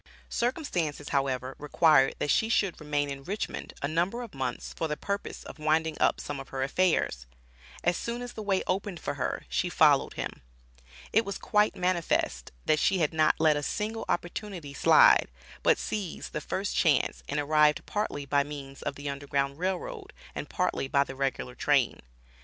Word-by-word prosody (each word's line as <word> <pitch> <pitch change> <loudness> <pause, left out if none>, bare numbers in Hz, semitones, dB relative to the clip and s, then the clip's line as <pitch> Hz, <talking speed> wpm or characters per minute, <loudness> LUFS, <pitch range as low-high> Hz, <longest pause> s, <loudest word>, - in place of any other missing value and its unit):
Circumstances, 180 - -1
however, 135 -2 0
required 150 -2 +4
that 145 - 0
she 220 - +2
should 200 -7 +1
remain 145 -1 0
in 140 0 -6
Richmond 200 +8 -4
a - - +2
number 175 +10 0
of 230 - -10
months 130 -3 -4
for 160 - -2
the 150 -1 -3
purpose 200 0 -4
of - - -10
winding 155 +1 +1
up - - +3
some 145 -1 -5
of 135 - -9
her 135 -1 -2
affairs. 140 - +1 0.6
As 175 0 +2
soon 235 +1 -4
as 245 - -7
the 220 - -6
way 200 -2 +1
opened 190 -1 -2
for - - -3
her, - - -3
she - - 0
followed - - +4
him. - - -5 0.7
It 225 - +5
was 200 -2 -4
quite 210 0 +2
manifest, 170 - 0
that 155 - +3
she 190 - +3
had 160 -3 +1
not 155 -1 +4
let 155 -1 +5
a 145 - -1
single 220 +8 -3
opportunity 175 -4 -3
slide, - - +6 0.3
but - - +4
seized 200 -6 -4
the 150 - -2
first 195 +6 -2
chance 155 -6 +2
and 145 - 0
arrived 150 0 +3
partly 205 -9 -2
by 140 +1 +3
means 140 -2 -8
of - - -3
the 145 +1 -7
Underground 140 0 -2
Rail 185 +1 +1
Road - - -8 0.2
and - - -5
partly - - -1
by 140 +1 +3
the 135 - -8
regular 135 -2 -2
train. 135 -2 +2
155 Hz, 180 wpm, -29 LUFS, 140-190 Hz, 0.7 s, slide